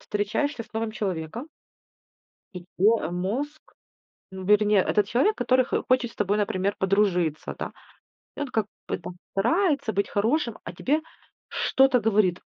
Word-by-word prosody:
встречаешься 225 +5 -1
с - - -21
новым 220 0 -2
человеком 195 - -4 1.1
и 180 - -7
твой, 215 +5 +4
а, 160 - -3
мозг, 245 +13 -3 0.7
ну 190 0 -7
да, 210 - +5
это 210 - +4
не 210 - +3
этот 200 +1 +3
человек, 375 - +2
который 255 0 +2
х - - -1
хочет 250 -2 +2
с - - -21
тобой, 205 0 +1
например, 200 -1 0
подружиться, 185 -5 +1
да. - - -4 0.7
И - - -7
он, 285 - -2
как 220 -4 0 0.2
бы, - - -1
там, 180 - -8 0.2
старается 285 - +1
быть 200 - 0
хорошим, 230 +3 0
а - - -6
тебе 300 +4 0 0.5
что-то 265 -2 +3
говорит: 205 -5 +2
215 Hz, 165 wpm, -26 LUFS, 195-255 Hz, 1.1 s, да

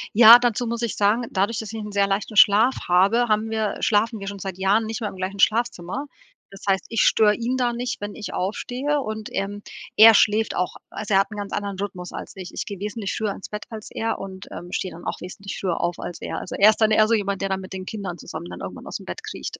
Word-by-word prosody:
Ja, 230 +1 +11
dazu 245 -1 0
muss 235 +1 -3
ich 230 - -2
sagen, 210 +4 +2
dadurch, 205 +4 0
dass 220 -1 -5
ich 225 - -4
'n 210 - -7
sehr 200 0 +2
leichten 200 +2 -2
Schlaf 215 +5 +6
habe, 200 +7 +4
haben 215 +1 +1
wir 220 -1 -1
schlafen 220 +1 +1
wir 195 - -7
schon 200 0 -5
seit 190 -1 -6
Jahren 200 +4 +2
nicht 225 +2 -4
mehr 210 - -2
im - - -11
gleichen 190 +2 -5
Schlafzimmer. 225 +1 +1 0.5
Das 195 - -12
heißt, 190 0 +1
ich 230 -1 +1
störe 210 -1 +5
ihn 245 +3 -2
da 245 -2 +1
nicht, 245 +1 -3
wenn 205 0 -5
ich 210 - -7
aufstehe 250 +9 -2
und, 215 -3 -5
ähm, 200 +1 -3 0.3
er 225 +1 +10
schläft 215 +1 +3
auch 180 - -1 0.2
also 210 -1 -2
er - - +6
hat 195 - -5
'n 210 - -7
ganz 205 -1 -5
anderen 200 -2 -3
Rhythmus 185 -3 -5
als - - -8
ich. 185 -2 -8
Ich - - -4
gehe 200 - -6
wesentlich 210 0 -4
früher 215 -2 -1
ins - - -10
Bett 210 0 -6
als 220 -2 -8
er 225 0 -2
und, 190 -1 -8
ähm, 175 +1 -8
stehe 185 - -3
dann 170 - -11
auch - - -3
wesentlich 195 +2 -7
früher 180 -4 -1
auf 175 0 -1
als 175 - -7
er. - - -4
Also, - - -7
er 205 +2 +8
ist 215 - +1
dann 220 -1 +4
eher 215 0 +5
so 230 - +3
jemand, 200 -2 -2
der 195 - -1
dann 190 0 -1
mit 190 0 -9
den 185 -1 -6
Kindern 190 -5 -6
zusammen - - -7
dann 90 - -8
irgendwann - - -7
aus - - -5
dem - - -14
Bett - - -7
kriecht. - - -6
205 Hz, 265 wpm, -23 LUFS, 195-225 Hz, 0.5 s, Ja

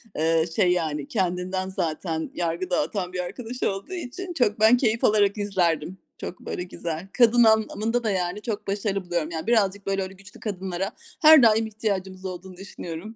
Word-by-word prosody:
eee, 160 +1 +2
şey, 185 -4 +4
yani 155 -5 -1
kendinden 185 -1 -1
zaten 160 -2 -3
yargı 175 +1 -2
dağıtan 180 0 -1
bir 180 - -3
arkadaş 225 +8 -5
olduğu 195 - -2
için 350 +3 -6
çok 225 -8 +1
ben 220 +3 +6
keyif 230 -2 +1
alarak 205 -1 +3
izlerdim. 180 -4 0 0.2
Çok 180 - -7
böyle 180 - -5
güzel. 170 0 -5
Kadın 240 0 +5
anlamında 220 +1 +2
da, 215 - +1
yani, 185 +1 -2
çok 210 -2 -4
başarılı 195 -1 -1
buluyorum. 170 -3 -1
Yani 160 +4 -5
birazcık 200 -4 +2
böyle 195 0 0
öyle 190 0 -7
güçlü 195 +1 -15
kadınlara 190 -1 -3 0.3
her 310 -4 +9
daim 220 0 +4
ihtiyacımız 195 -3 -3
olduğunu 185 0 -7
düşünüyorum. 190 +2 -8
195 Hz, 170 wpm, -25 LUFS, 180-220 Hz, 0.3 s, her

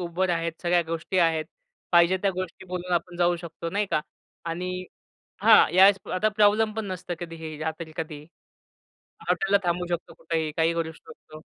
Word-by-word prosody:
Uber 180 +2 -1
आहेत, 170 -1 -1
सगळ्या 175 0 +3
गोष्टी 165 +3 -2
आहेत. 165 -2 +3 0.5
पाहिजे 175 +2 +5
त्या 200 - +3
गोष्टी 185 +1 -5
बोलून 180 0 -4
आपण 175 +1 -1
जाऊ 175 0 +2
शकतो 170 0 -7
नाही 205 +1 0
का - - +2 0.4
आणि 180 +2 -4 0.6
हां, 220 -7 +7
या 185 +2 +6
वेळेस 200 0 +6 0.2
आता 210 +4 +2
प्रॉब्लेम 215 +1 +4
पण 220 -1 -3
नसतं 180 -1 -5
कधीही. 165 -2 -7
जातील 160 +1 -5
कधी. 155 -3 -5 1.0
हॉटेलला 195 +1 +3
थांबू 175 0 0
शकतो 175 -1 -4
कुठेही, 160 -1 -2
काहीही 165 +1 +2
करू 165 -1 -2
शकतो. 155 -1 -14
175 Hz, 165 wpm, -26 LUFS, 165-185 Hz, 1.0 s, हां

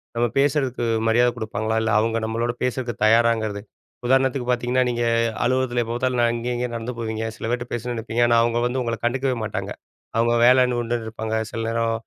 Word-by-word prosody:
நம்ம 120 +1 +2
பேசுறதுக்கு 135 -4 +1 0.2
மரியாதை 120 +2 +4
குடுப்பாங்களா? 110 0 -2
இல்ல, 110 - 0
அவங்க 115 +1 0
நம்மளோட 115 +2 -1
பேசுறதுக்கு 125 -3 -2
தயாராங்கிறது. 110 -2 +2 0.5
உதாரணத்துக்கு 130 -1 +2
பார்த்தீங்கன்னா, 125 +1 +1
நீங்க 120 0 -1 0.4
அலுவலகத்தில 125 -1 +1
எப்போ 115 +1 -4
பார்த்தாலும் 125 0 0
ந - - +4
அங்கே 120 +1 -3
இங்கேனு 120 -1 -3
நடந்து 115 +2 -5
போவீங்க. 110 -1 -3
சில - - -6
பேர்கிட்ட 120 0 -3
பேசணும்னு 120 +1 -3
நினைப்பீங்க. 115 +1 0
ஆனா 115 - +4
அவங்க 115 0 0
வந்து 125 +1 -1
உங்கள 115 -1 -2
கண்டுக்கவே 130 +1 0
மாட்டாங்க. 105 - -4 0.5
அவங்க 115 +1 +3
வேலைன்னு 125 -1 +4
உண்டுன்னு 115 -1 -3
இருப்பாங்க. 110 0 -4 0.2
சில 115 - -4
நேரம் 115 0 0
120 Hz, 180 wpm, -23 LUFS, 115-125 Hz, 0.5 s, மரியாதை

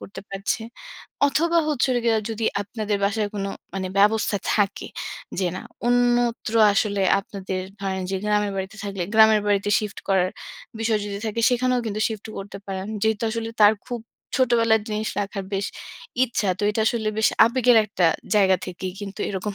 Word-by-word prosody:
করতে 200 - -9
পারছে। 195 +3 -2 0.7
অথবা 335 +4 +2
হচ্ছে 290 -4 +1
হলো 245 -1 +1
গিয়া 225 -1 +3
যদি 225 0 -3 0.2
আপনাদের 210 0 -2
বাসায় 205 +1 0
কোনো 200 -1 -2 0.2
মানে 190 -1 -2
ব্যবস্থা 210 +1 +3 0.2
থাকে 205 -2 0 0.5
যে 185 - +1
না, - - -6 0.2
অন্যত্র 240 -2 +2 0.2
আসলে 200 -1 +1 0.2
আপনাদের 190 -2 -5 0.2
ধরেন 190 -1 -2
যে 195 - 0
গ্রামের 210 -1 +1
বাড়িতে 190 +2 -4
থাকলে, 195 -2 -3
গ্রামের 220 -1 +7
বাড়িতে 205 0 +1
শিফট 210 -2 -5
করার 185 -2 +3 0.5
বিষয় 225 -1 +1
যদি 200 -1 -4
থাকে 220 +1 -2
সেখানেও 250 0 +1
কিন্তু 215 0 -3
শিফট 220 -2 -6
করতে 200 0 -7
পারেন। 190 -1 -4 0.2
যেহেতু 220 0 +1
আসলে 225 0 -3
তার 210 +1 +8
খুব 240 -2 -4 0.4
ছোটবেলার 230 -3 +3
জিনিস 215 0 -2
রাখার 200 -1 -4
বেশ 195 +1 -1 0.6
ইচ্ছা 225 -5 -1
তো - - -5
এটা 210 - -1
আসলে 220 -2 +1
বেশ 220 - +4 0.2
আবেগের 245 0 +4
একটা 190 -4 +1 0.3
জায়গা 190 -2 +5
থেকেই 185 0 -5
কিন্তু 200 0 -7
এরকম 200 +1 -3
210 Hz, 165 wpm, -23 LUFS, 195-225 Hz, 0.7 s, তার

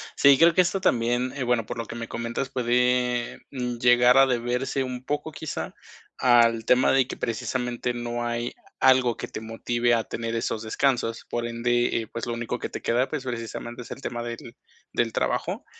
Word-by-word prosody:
Sí, 140 -1 +6
creo 165 0 +6
que 185 - +5
esto 185 +2 0
también, 120 -4 +1
eh, 135 - -2
bueno, 120 -3 +1
por - - -6
lo 115 - -3
que 115 - -8
me 115 0 -5
comentas, 115 +3 -3
puede, 125 -1 +1
mm, 125 -3 -3
llegar 125 +1 +5
a 135 0 +7
deberse 125 +2 -1
un 125 -1 -5
poco 150 +3 -3
quizá 155 0 -5 0.4
al 115 -2 +4
tema 125 +2 +4
de 135 -2 +3
que - - -6
precisamente 120 +1 -2
no 120 0 -3
hay 120 0 -2 0.3
algo 130 -2 +4
que - - -6
te - - -6
motive 120 +2 0
a 115 -1 +2
tener 115 0 -4
esos 115 -1 -2
descansos. 115 0 0
Por 120 0 -2
ende, 120 0 +1
eh, 110 - -8
pues 115 - -4
lo 120 - -3
único 120 +1 -3
que - - -3
te - - -6
queda, 125 +3 +1
pues, 150 -4 -4
precisamente, 120 0 -5
es - - -13
el - - -7
tema 120 -3 -4
del 120 0 -7 0.4
del 115 -1 +1
trabajo, - - -1
120 Hz, 195 wpm, -25 LUFS, 115-125 Hz, 0.4 s, a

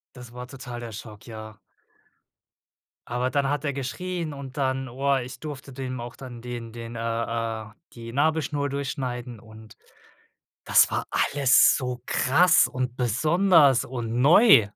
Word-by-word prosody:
Das 120 -1 -12
war 125 0 -8
total 125 -2 -8
der 115 -1 -7
Schock, 110 +1 -10
ja. 110 -1 -9 1.5
Aber 125 +1 -1
dann 140 +1 0
hat 145 0 -1
er 140 - 0
geschrien 155 +5 -4
und 140 0 -9
dann, 130 -1 -1
oah, 135 +1 0
ich 125 +1 -9
durfte 145 -3 -8
dem 130 -2 -5
auch 120 +1 -8
dann 125 -3 -9
den 120 -2 -7
den 115 0 -8
äh, - - -5
äh, 115 -1 -2 0.3
die 115 -1 -9
Nabelschnur 145 0 0
durchschneiden 130 -4 -4
und 110 -1 -15 0.9
das - - +5
war - - -1
alles 140 -3 +4
so 125 -2 -4
krass 170 +6 +4
und 125 -1 -4
besonders 150 - +4
und 120 -2 -4
neu. 165 - +7
125 Hz, 145 wpm, -25 LUFS, 120-140 Hz, 1.5 s, neu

